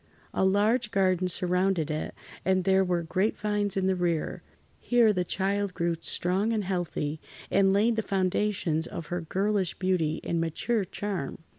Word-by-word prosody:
A -, -, +1 dB
large 210 Hz, +5 st, +2 dB
garden 185 Hz, -3 st, +2 dB
surrounded 180 Hz, -2 st, +1 dB
it 155 Hz, 0 st, -4 dB, 0.3 s
and 185 Hz, 0 st, +2 dB
there 190 Hz, +1 st, +4 dB
were 175 Hz, -2 st, 0 dB
grapevines 205 Hz, +2 st, 0 dB
in 190 Hz, -, +1 dB
the 190 Hz, 0 st, +2 dB
rear. 170 Hz, -3 st, -1 dB, 0.4 s
Here 235 Hz, -3 st, +4 dB
the 180 Hz, -2 st, 0 dB
child 195 Hz, +1 st, -1 dB
grew 170 Hz, -1 st, 0 dB
strong 190 Hz, +7 st, 0 dB
and 215 Hz, -2 st, 0 dB
healthy, 175 Hz, -5 st, -2 dB, 0.3 s
and 195 Hz, 0 st, +4 dB
laid 220 Hz, +4 st, +3 dB
the -, -, +2 dB
foundations 185 Hz, -4 st, 0 dB
of 165 Hz, -, -6 dB
her 175 Hz, -, -1 dB
girlish 195 Hz, +2 st, 0 dB
beauty 175 Hz, -4 st, 0 dB
and 170 Hz, -1 st, -1 dB
mature 195 Hz, +6 st, -1 dB
charm. 180 Hz, -6 st, -4 dB
190 Hz, 155 wpm, -28 LUFS, 175-205 Hz, 0.4 s, there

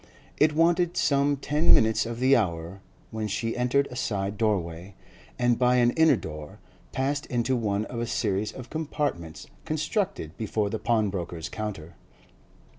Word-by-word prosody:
It 150 Hz, 0 st, +4 dB
wanted 170 Hz, +2 st, +2 dB
some 140 Hz, 0 st, +2 dB
ten 150 Hz, +4 st, +4 dB
minutes 110 Hz, +1 st, +2 dB
of 115 Hz, 0 st, -5 dB
the 130 Hz, +2 st, +5 dB
hour 85 Hz, -2 st, -2 dB, 0.3 s
when 110 Hz, -1 st, -3 dB
she 115 Hz, +3 st, -2 dB
entered 125 Hz, +3 st, +2 dB
a -, -, -7 dB
side 100 Hz, -5 st, -2 dB
doorway, 95 Hz, -4 st, -2 dB, 0.4 s
and, 120 Hz, -1 st, +2 dB
by 125 Hz, 0 st, +4 dB
an 120 Hz, -1 st, +4 dB
inner 160 Hz, -1 st, +5 dB
door, 75 Hz, -7 st, -8 dB, 0.3 s
passed 140 Hz, +2 st, -1 dB
into 125 Hz, +1 st, 0 dB
one 105 Hz, -3 st, -1 dB
of 115 Hz, -, -6 dB
a 120 Hz, -, -2 dB
series 105 Hz, -2 st, -1 dB
of 130 Hz, -2 st, -10 dB
compartments 145 Hz, -, -3 dB, 0.2 s
constructed 155 Hz, -, -2 dB
before 105 Hz, -2 st, -1 dB
the 110 Hz, -, -2 dB
pawnbroker's 95 Hz, -7 st, -1 dB
counter. 100 Hz, -7 st, -6 dB
115 Hz, 150 wpm, -26 LUFS, 100-140 Hz, 0.4 s, the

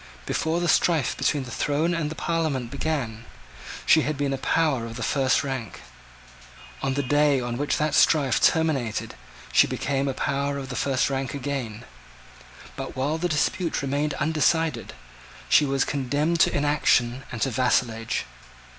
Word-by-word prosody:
Before 160 Hz, +2 st, -1 dB
the 175 Hz, -, -1 dB
strife 160 Hz, -4 st, +2 dB
between 145 Hz, -2 st, 0 dB
the 125 Hz, -, -9 dB
throne 150 Hz, +8 st, 0 dB
and 165 Hz, -3 st, -1 dB
the 160 Hz, -, -6 dB
Parliament 155 Hz, -9 st, -2 dB
began, 135 Hz, -6 st, -3 dB, 0.6 s
she 160 Hz, -, +6 dB
had 150 Hz, -1 st, -2 dB
been 140 Hz, -1 st, -1 dB
a -, -, -2 dB
power 135 Hz, -6 st, +1 dB
of 115 Hz, -, -8 dB
the 125 Hz, -, -4 dB
first 130 Hz, +1 st, +2 dB
rank: 130 Hz, -6 st, -5 dB, 1.0 s
on 135 Hz, -1 st, -1 dB
the 140 Hz, -, 0 dB
day 145 Hz, +1 st, +3 dB
on 120 Hz, -1 st, -3 dB
which 145 Hz, +4 st, -1 dB
that 150 Hz, 0 st, 0 dB
strife 140 Hz, -6 st, +3 dB
terminated 140 Hz, -9 st, +1 dB, 0.4 s
she -, -, +6 dB
became 140 Hz, 0 st, -1 dB
a 135 Hz, -, -2 dB
power 140 Hz, 0 st, -1 dB
of 135 Hz, -2 st, -6 dB
the 125 Hz, -, -5 dB
first 135 Hz, +3 st, 0 dB
rank 135 Hz, -1 st, -2 dB
again: 130 Hz, -6 st, -4 dB, 0.9 s
but -, -, -6 dB
while 145 Hz, +5 st, -1 dB
the 175 Hz, +1 st, -1 dB
dispute 165 Hz, +1 st, 0 dB
remained 140 Hz, +1 st, -1 dB
undecided, 155 Hz, -3 st, 0 dB, 0.5 s
she 150 Hz, -, +5 dB
was 135 Hz, -1 st, +1 dB
condemned 145 Hz, +5 st, -1 dB
to -, -, +5 dB
inaction 135 Hz, -4 st, +2 dB
and 120 Hz, -4 st, -2 dB
to 135 Hz, -, 0 dB
vassalage. 115 Hz, -2 st, 0 dB
140 Hz, 160 wpm, -25 LUFS, 130-150 Hz, 1.0 s, she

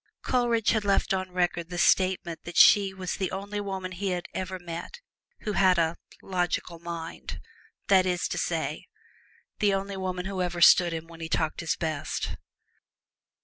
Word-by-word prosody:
Coleridge 235 Hz, -3 st, +2 dB
has 220 Hz, -2 st, +1 dB
left 200 Hz, -1 st, +2 dB
on 185 Hz, 0 st, -2 dB
record 175 Hz, -1 st, -1 dB
the 175 Hz, -, -5 dB
statement 185 Hz, -2 st, +2 dB
that 175 Hz, -, -7 dB
she 200 Hz, -2 st, +7 dB
was 190 Hz, -1 st, -4 dB
the 190 Hz, -, -2 dB
only 200 Hz, +2 st, -4 dB
woman 190 Hz, -2 st, -4 dB
he 180 Hz, 0 st, -2 dB
ever 185 Hz, 0 st, -4 dB
met 175 Hz, -, -7 dB, 0.4 s
who 210 Hz, -, -2 dB
had 185 Hz, -2 st, +4 dB
a 165 Hz, 0 st, +2 dB, 0.3 s
"logical 175 Hz, -2 st, -2 dB
mind" 170 Hz, -1 st, -6 dB, 0.5 s
that 190 Hz, -2 st, +5 dB
is 180 Hz, -1 st, 0 dB
to -, -, -2 dB
say, -, -, -2 dB, 0.7 s
the 205 Hz, -2 st, +3 dB
only 195 Hz, 0 st, -4 dB
woman 185 Hz, -1 st, -3 dB
who 190 Hz, -1 st, -3 dB
ever 175 Hz, -1 st, -2 dB
understood 175 Hz, 0 st, +7 dB
him 165 Hz, 0 st, -4 dB
when 165 Hz, 0 st, -13 dB
he 160 Hz, -, -5 dB
talked 160 Hz, -1 st, 0 dB
his 165 Hz, -2 st, -1 dB
best. 155 Hz, -3 st, -3 dB
185 Hz, 165 wpm, -27 LUFS, 170-195 Hz, 0.7 s, she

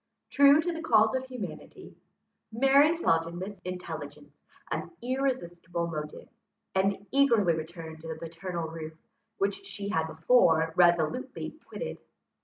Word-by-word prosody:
True 280 Hz, +1 st, +7 dB
to 345 Hz, +2 st, 0 dB
the 325 Hz, -, -5 dB
calls 220 Hz, -6 st, +4 dB
of 260 Hz, 0 st, -2 dB
humanity, 250 Hz, -6 st, -8 dB, 0.6 s
Mary 275 Hz, +7 st, +5 dB
felt 165 Hz, -, +2 dB
in 170 Hz, +1 st, -7 dB
this 195 Hz, +2 st, -6 dB
intelligence 180 Hz, 0 st, -7 dB, 0.4 s
an -, -, -3 dB
irresistible 185 Hz, -10 st, -2 dB
motive, 150 Hz, -2 st, -6 dB, 0.5 s
and 195 Hz, +1 st, +1 dB
eagerly 235 Hz, -10 st, +4 dB
returned 160 Hz, 0 st, -7 dB
to 165 Hz, -, -9 dB
the 160 Hz, -, -4 dB
paternal 170 Hz, +1 st, -5 dB
roof, 160 Hz, 0 st, -7 dB, 0.4 s
which 200 Hz, 0 st, -1 dB
she 200 Hz, 0 st, -5 dB
had 160 Hz, -5 st, 0 dB
before 160 Hz, -2 st, +3 dB
resolutely 175 Hz, -, +2 dB
quitted. -, -, -6 dB
190 Hz, 130 wpm, -29 LUFS, 165-255 Hz, 0.6 s, True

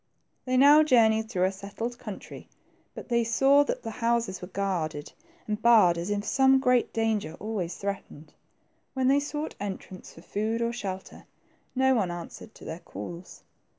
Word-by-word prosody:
They 255 Hz, 0 st, +1 dB
now 290 Hz, +3 st, +8 dB
journeyed 220 Hz, -6 st, +3 dB
through 185 Hz, -6 st, 0 dB
a 190 Hz, -, +2 dB
settled 205 Hz, +5 st, -6 dB
country, -, -, -9 dB, 0.5 s
but -, -, -9 dB
they 235 Hz, -1 st, +2 dB
saw 270 Hz, +5 st, +4 dB
that -, -, -3 dB
the 225 Hz, -, -4 dB
houses 230 Hz, -5 st, 0 dB
were 180 Hz, -, -6 dB
guarded 180 Hz, -6 st, -3 dB, 0.3 s
and 210 Hz, 0 st, -3 dB
barred 220 Hz, -7 st, +6 dB
as 170 Hz, +3 st, -4 dB
if 205 Hz, 0 st, -2 dB
some 265 Hz, +3 st, +4 dB
great 250 Hz, -2 st, +2 dB
danger 220 Hz, -6 st, -1 dB
always 195 Hz, -5 st, -3 dB
threatened. 195 Hz, -6 st, -6 dB, 0.6 s
When 260 Hz, -1 st, +2 dB
they 280 Hz, +1 st, +4 dB
sought 295 Hz, +2 st, -4 dB
entrance 190 Hz, -2 st, -7 dB
for 165 Hz, -, -15 dB
food 220 Hz, +3 st, -2 dB
or 235 Hz, 0 st, -1 dB
shelter, 190 Hz, -5 st, -7 dB, 0.5 s
no 265 Hz, 0 st, +3 dB
one 205 Hz, -8 st, +1 dB
answered 175 Hz, +5 st, -8 dB
to -, -, -13 dB
their 160 Hz, +2 st, -6 dB
calls. 175 Hz, 0 st, -9 dB
220 Hz, 165 wpm, -27 LUFS, 190-245 Hz, 0.6 s, now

